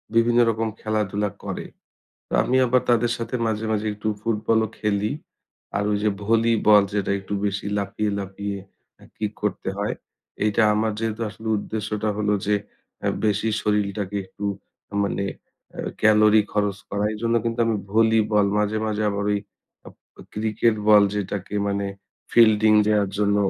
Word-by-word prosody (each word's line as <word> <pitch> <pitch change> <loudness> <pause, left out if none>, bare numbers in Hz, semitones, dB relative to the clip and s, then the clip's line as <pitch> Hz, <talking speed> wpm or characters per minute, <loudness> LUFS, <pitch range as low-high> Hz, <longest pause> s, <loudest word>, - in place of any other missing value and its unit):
বিভিন্ন 120 +1 +4
রকম 115 0 0
খেলাধুলা 105 -1 -1
করে। - - -5 0.6
তো - - -13
আমি 130 - +1
আবার 125 +1 +3
তাদের 120 0 +3
সাথে 115 +1 -5
মাঝে, 110 0 -1
মাঝে 110 0 -1
একটু 105 +1 -4
ফুটবলও 110 0 +1
খেলি। 105 +2 0 0.6
আর 100 - +1
ওই 105 - +2
যে, 105 - +3 0.2
ভলিবল 110 -1 +4
যেটা 100 -2 0
একটু 95 - -9
বেশি 100 0 -3
লাফিয়ে, 105 +1 -2
লাফিয়ে 100 +1 -4 0.6
কিক 105 -1 -3
করতে 105 -2 -2
হয়, 105 - -1 0.5
এইটা 105 +1 +2
আমার 110 0 +1
যেহেতু 115 0 -2
আসলে 110 +1 -8
উদ্দেশ্যটা 110 0 -3
হলো 105 -1 +1
যে, 105 - +3 0.7
বেশি 105 +1 +1
শরীরটাকে 105 -1 -1
একটু 100 +2 -9 0.6
মানে 100 0 -2 0.5
এ - - -11 0.2
calorie 110 0 +5
খরচ 105 -1 0
করা। 100 +1 -1
এইজন্য 115 +2 -1
কিন্তু 115 0 -2
আমি 115 -1 +1 0.2
ভলিবল 110 -2 +3
মাঝে, 105 +1 0
মাঝে 110 0 -1
আবার 100 0 -2
ওই 100 - -1 0.9
ক্রিকেট 110 +1 +1
বল 105 -1 +8
যেটাকে 100 0 -4
মানে 100 0 -1 0.5
fielding 110 -2 +6
দেওয়ার 105 -2 +2
জন্য 100 0 +2
105 Hz, 145 wpm, -23 LUFS, 105-110 Hz, 0.9 s, বল